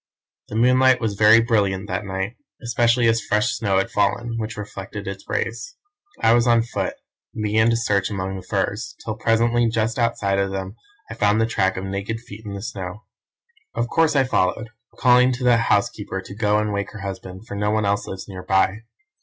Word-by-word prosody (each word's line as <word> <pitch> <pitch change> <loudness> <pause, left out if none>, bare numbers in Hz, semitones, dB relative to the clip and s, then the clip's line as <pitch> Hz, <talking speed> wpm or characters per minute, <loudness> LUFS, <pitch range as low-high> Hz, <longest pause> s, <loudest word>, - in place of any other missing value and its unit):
"The - - -8
moonlight 130 +2 +4
was 110 -3 -1
very 110 +2 +6
brilliant 100 -4 0
that 95 +3 -3
night, 95 +4 -3 0.3
especially 120 0 +2
as 115 0 +2
fresh 105 +4 +1
snow 100 -3 0
had 95 - 0
fallen, 115 +2 0
which 110 0 -5
reflected 100 0 -7
its 100 0 -7
rays. - - -3 0.4
I 115 - +4
was 120 0 +3
on 115 -1 +4
foot, 120 - -3 0.4
and 110 - -3
began 110 +2 +3
to 115 - +2
search 100 -5 +1
among 95 -1 -3
the 95 - -6
firs, 105 +5 -2
till 110 - -2
presently 115 +2 +2
just 115 +1 -1
outside 100 -4 +1
of 100 0 0
them 95 +1 -5 0.4
I - - -4
found 105 -1 +2
the 115 - +3
track 95 -4 0
of 95 - -4
naked 100 +3 -3
feet 110 -2 -12
in 105 -2 -6
the 100 - -7
snow. 100 -1 -6 0.7
Of 120 +1 -1
course 160 -2 +2
I 135 - +5
followed, 110 -2 0 0.3
calling 125 0 +5
to 125 +1 -5
the 120 -1 +5
housekeeper 105 -3 0
to 95 - -9
go 105 -1 +2
and 105 -1 -1
wake 100 0 -3
her 105 - -8
husband, 95 0 -7
for - - -7
no 105 +1 -1
one 110 0 +1
else 100 0 0
lives 95 - -7
near 95 -2 -8
by. 95 +2 +1
105 Hz, 205 wpm, -22 LUFS, 100-115 Hz, 0.7 s, very